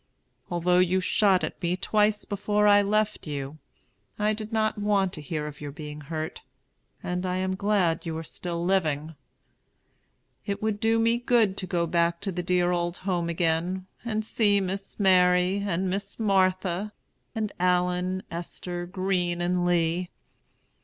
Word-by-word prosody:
Although 180 Hz, +1 st, +2 dB
you 185 Hz, +1 st, +3 dB
shot 190 Hz, 0 st, +3 dB
at -, -, -4 dB
me 175 Hz, 0 st, 0 dB
twice 210 Hz, +1 st, +1 dB
before 210 Hz, +1 st, 0 dB
I 205 Hz, 0 st, +7 dB
left 210 Hz, -1 st, 0 dB
you, 145 Hz, +1 st, -5 dB, 0.6 s
I 210 Hz, +1 st, +1 dB
did 215 Hz, +1 st, -6 dB
not 215 Hz, -1 st, 0 dB
want 200 Hz, -3 st, +1 dB
to 155 Hz, -, -6 dB
hear 150 Hz, +1 st, -3 dB
of 150 Hz, -1 st, -8 dB
your 145 Hz, -1 st, -5 dB
being 150 Hz, +1 st, -8 dB
hurt, 155 Hz, +1 st, -5 dB, 0.6 s
and 180 Hz, 0 st, -2 dB
am 185 Hz, +1 st, -1 dB
glad 195 Hz, -4 st, +1 dB
you 160 Hz, -2 st, -4 dB
are 160 Hz, -, -4 dB
still 170 Hz, +1 st, -4 dB
living. 160 Hz, -5 st, 0 dB, 1.3 s
It 200 Hz, -1 st, -3 dB
would 215 Hz, -1 st, -1 dB
do 225 Hz, +1 st, +2 dB
me 230 Hz, +1 st, +2 dB
good 235 Hz, -5 st, +3 dB
to 185 Hz, -, -2 dB
go 170 Hz, -1 st, 0 dB
back 170 Hz, 0 st, +1 dB
to 200 Hz, -, -2 dB
the 180 Hz, 0 st, -3 dB
dear 180 Hz, 0 st, +2 dB
old 175 Hz, 0 st, -1 dB
home 175 Hz, -3 st, 0 dB
again, 170 Hz, +2 st, 0 dB, 0.2 s
and 220 Hz, -2 st, -2 dB
see 205 Hz, -2 st, +2 dB
Miss 195 Hz, +2 st, -4 dB
Mary 180 Hz, -1 st, +4 dB
and 190 Hz, -2 st, -1 dB
Miss 200 Hz, +2 st, -3 dB
Martha 190 Hz, -1 st, +1 dB, 0.4 s
and 215 Hz, -2 st, -2 dB
Allen, 180 Hz, +1 st, +1 dB
Esther, 175 Hz, +1 st, -5 dB
Green, 180 Hz, -2 st, -1 dB
and 175 Hz, 0 st, 0 dB
Lee. 175 Hz, +1 st, +1 dB
185 Hz, 155 wpm, -26 LUFS, 170-205 Hz, 1.3 s, I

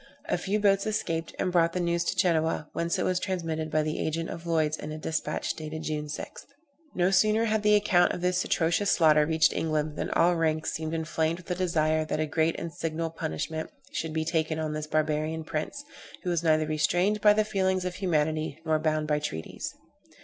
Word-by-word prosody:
A -, -, 0 dB
few 205 Hz, +2 st, -1 dB
boats 200 Hz, 0 st, +3 dB
escaped, 165 Hz, -6 st, -2 dB
and 185 Hz, -, 0 dB
brought 170 Hz, -1 st, +3 dB
the 180 Hz, -, -1 dB
news 170 Hz, -1 st, +1 dB
to -, -, -1 dB
Genoa, 160 Hz, -4 st, +1 dB
whence 170 Hz, 0 st, -1 dB
it -, -, 0 dB
was 185 Hz, -1 st, +1 dB
transmitted 165 Hz, -5 st, -2 dB
by 155 Hz, 0 st, +1 dB
the 155 Hz, 0 st, -2 dB
agent 165 Hz, +1 st, -2 dB
of 170 Hz, +1 st, -8 dB
Lloyd's 155 Hz, -2 st, +1 dB
in 150 Hz, 0 st, -7 dB
a 155 Hz, -, -5 dB
despatch, 160 Hz, +1 st, -2 dB
dated 155 Hz, 0 st, -6 dB
June 150 Hz, -1 st, -2 dB
6th. 150 Hz, -, -7 dB, 0.5 s
No 180 Hz, +1 st, +2 dB
sooner 215 Hz, +3 st, +3 dB
had 220 Hz, -1 st, +1 dB
the 210 Hz, 0 st, +5 dB
account 190 Hz, -4 st, +4 dB
of -, -, -4 dB
this 180 Hz, 0 st, +1 dB
atrocious 170 Hz, +4 st, +1 dB
slaughter 150 Hz, -3 st, +5 dB
reached 160 Hz, -1 st, +3 dB
England, 155 Hz, -1 st, -1 dB
than -, -, -2 dB
all 175 Hz, +1 st, +3 dB
ranks 160 Hz, -1 st, 0 dB
seemed 160 Hz, 0 st, -3 dB
inflamed 160 Hz, 0 st, -1 dB
with 180 Hz, 0 st, -9 dB
a -, -, +3 dB
desire 160 Hz, -3 st, +1 dB
that 155 Hz, -, -3 dB
a 155 Hz, -, +1 dB
great 160 Hz, +1 st, 0 dB
and 165 Hz, -, -5 dB
signal 165 Hz, -1 st, -3 dB
punishment 160 Hz, -, -4 dB, 0.2 s
should 160 Hz, -, -3 dB
be 160 Hz, 0 st, -1 dB
taken 160 Hz, -1 st, 0 dB
on 155 Hz, -1 st, -2 dB
this 155 Hz, 0 st, -4 dB
barbarian 155 Hz, +1 st, 0 dB
prince, 160 Hz, -, -4 dB, 0.4 s
who 180 Hz, -, -1 dB
was 170 Hz, -2 st, +1 dB
neither 155 Hz, -2 st, +3 dB
restrained 175 Hz, +7 st, +1 dB
by 210 Hz, -1 st, +7 dB
the 215 Hz, 0 st, +2 dB
feelings 190 Hz, -2 st, 0 dB
of 180 Hz, -, -2 dB
humanity 155 Hz, -4 st, 0 dB
nor 155 Hz, -1 st, +2 dB
bound 155 Hz, -1 st, 0 dB
by 150 Hz, -1 st, +1 dB
treaties. 80 Hz, -, -5 dB
160 Hz, 210 wpm, -28 LUFS, 155-180 Hz, 0.5 s, by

